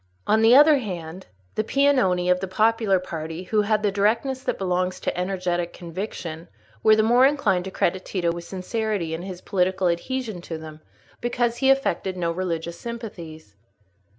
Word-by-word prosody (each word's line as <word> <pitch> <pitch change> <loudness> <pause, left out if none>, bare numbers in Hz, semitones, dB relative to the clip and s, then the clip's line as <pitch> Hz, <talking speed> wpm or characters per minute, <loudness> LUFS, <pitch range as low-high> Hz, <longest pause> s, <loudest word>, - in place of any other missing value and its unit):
On 220 +1 +3
the 225 +2 +7
other 295 +1 +7
hand, 180 -5 -6 0.3
the 215 - 0
Piagnoni 235 -9 +2
of 180 - +3
the 190 - -4
popular 215 +1 +2
party, 165 -1 -6
who 210 +3 +1
had 210 0 +1
the 205 - +2
directness 230 +7 +1
that - - -2
belongs 185 -1 -1
to - - -2
energetic 180 -2 -2
conviction, 170 -2 -6 0.3
were 215 - +6
the 215 - +3
more 240 +3 +5
inclined 205 -11 +1
to - - -4
credit 185 0 -1
Tito 175 -3 -1
with 170 0 -6
sincerity 190 -1 -3
in 165 - -4
his 185 -1 -7
political 185 -1 0
adhesion 220 +2 -3
to 165 -1 -6
them, 155 -1 -10 0.4
because 240 -1 -1
he 270 - +2
affected 270 -8 +1
no 170 -2 0
religious 170 -1 -3
sympathies. 170 - -8
190 Hz, 170 wpm, -24 LUFS, 175-225 Hz, 0.4 s, the